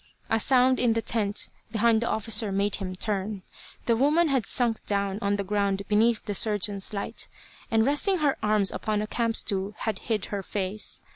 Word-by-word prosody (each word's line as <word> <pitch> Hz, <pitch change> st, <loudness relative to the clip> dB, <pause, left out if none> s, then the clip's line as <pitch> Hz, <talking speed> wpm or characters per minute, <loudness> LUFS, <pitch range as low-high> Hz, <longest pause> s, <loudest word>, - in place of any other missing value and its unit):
A 225 Hz, -, +3 dB
sound 255 Hz, +2 st, +4 dB
in 240 Hz, -2 st, +3 dB
the 230 Hz, -, 0 dB
tent 210 Hz, -3 st, 0 dB, 0.2 s
behind 225 Hz, 0 st, +3 dB
the 235 Hz, -, -1 dB
officer 220 Hz, -1 st, +1 dB
made 200 Hz, +1 st, 0 dB
him 185 Hz, -2 st, -5 dB
turn. 200 Hz, 0 st, -3 dB, 0.4 s
The 230 Hz, -, +3 dB
woman 300 Hz, +7 st, +3 dB
had 260 Hz, -7 st, 0 dB
sunk 235 Hz, -3 st, 0 dB
down 200 Hz, -1 st, -1 dB
on 200 Hz, 0 st, +1 dB
the 200 Hz, -, -2 dB
ground 200 Hz, 0 st, 0 dB
beneath 220 Hz, +2 st, +2 dB
the 205 Hz, -, -3 dB
surgeon's 205 Hz, -1 st, +1 dB
light, 200 Hz, -2 st, -3 dB, 0.4 s
and 225 Hz, -2 st, +3 dB
resting 295 Hz, +8 st, +2 dB
her 295 Hz, -4 st, +1 dB
arms 210 Hz, -2 st, +2 dB
upon 210 Hz, -1 st, -2 dB
a -, -, -2 dB
camp 230 Hz, +1 st, -1 dB
stool 200 Hz, -1 st, -1 dB
had 220 Hz, -, -2 dB
hid 220 Hz, -4 st, -2 dB
her 200 Hz, -, -1 dB
face. 195 Hz, +2 st, -3 dB
215 Hz, 190 wpm, -26 LUFS, 200-235 Hz, 0.4 s, sound